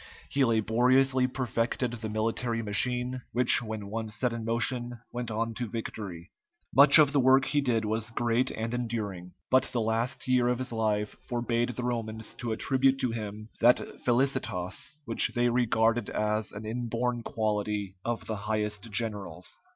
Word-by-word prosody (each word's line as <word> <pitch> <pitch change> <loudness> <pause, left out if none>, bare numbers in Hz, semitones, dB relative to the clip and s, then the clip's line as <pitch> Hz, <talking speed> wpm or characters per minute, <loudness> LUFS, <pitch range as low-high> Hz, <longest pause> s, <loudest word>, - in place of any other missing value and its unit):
He 140 - +2
laboriously 125 +3 +3
perfected 125 -1 -1
the 110 -2 -5
military 115 +2 -1
machine, 125 +4 0
which 120 0 +4
when 110 -3 -5
once 110 +1 -4
set 120 +2 0
in 115 -1 -4
motion 120 +1 -1
went 120 -1 -4
on 115 +1 -2
to 120 0 -4
victory. 100 -6 -6 0.4
Much 140 +4 +9
of 150 -3 +6
the 145 - +4
work 130 +1 +5
he 145 0 +1
did 115 -5 0
was 110 +1 -1
great 120 +1 +1
and 115 +1 -4
enduring, 105 -7 -4 0.2
but 130 +1 +5
the 120 - -2
last 115 +6 -1
year 125 -1 +3
of 125 0 +1
his 130 0 -4
life 105 -2 -1
forbade 120 0 0
the 125 0 -4
Romans 110 -2 -3
to 120 -2 -5
attribute 135 +4 +2
to 125 - 0
him 110 -1 -6
that 120 +2 +6 0.2
felicitas 125 -1 -1
which 115 - +2
they 120 0 +3
regarded 115 -2 +2
as 105 0 -1
an 105 +1 -8
inborn 120 +1 -2
quality 105 -3 -2
of 120 -1 -3
the 110 - -3
highest 105 +1 -3
generals. 100 -5 -4
115 Hz, 160 wpm, -28 LUFS, 110-125 Hz, 0.4 s, Much